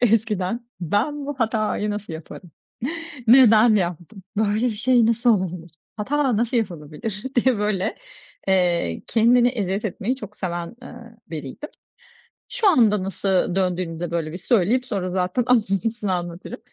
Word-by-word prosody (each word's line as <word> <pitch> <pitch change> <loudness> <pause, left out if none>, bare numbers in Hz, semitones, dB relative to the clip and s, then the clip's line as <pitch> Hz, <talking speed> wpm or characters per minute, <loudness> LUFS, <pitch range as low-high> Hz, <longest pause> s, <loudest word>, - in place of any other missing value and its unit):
Eskiden 225 -1 +1
ben, 235 - -1
"Bu 290 - -3
hatayı 215 -2 0
nasıl 205 -3 -5
yaparım? 160 +2 -9 0.8
Neden 230 -2 +7
yaptım, 180 +1 -3
böyle 215 +2 +1
bir - - +2
şey 235 +2 +3
nasıl 235 +2 +2
olabilir, 175 -2 -6 0.3
hata 260 +1 0
nasıl 235 +2 +1
yapılabilir?" 185 +1 -4
diye 250 -1 +3
böyle, 205 -2 -1 0.5
eee, 175 - +1
kendine 240 +2 +4
eziyet 205 -4 -2
etmeyi 215 +5 -2
çok 210 -5 -10
seven, 175 +1 -4
eee, 250 - -10 0.3
biriydim. 155 - -7 0.8
Şu 485 -4 +1
anda 215 - +4
nasıl 190 -1 0
döndüğünü 180 -3 -1
de 175 -1 -4
böyle 165 -2 -2
bir 175 - -6
söyleyip 230 +5 +2
sonra 195 -6 -3
zaten 185 +6 0
ayrıntısını 215 -3 +1
anlatırım. 175 +7 -5
210 Hz, 135 wpm, -23 LUFS, 180-235 Hz, 0.8 s, Neden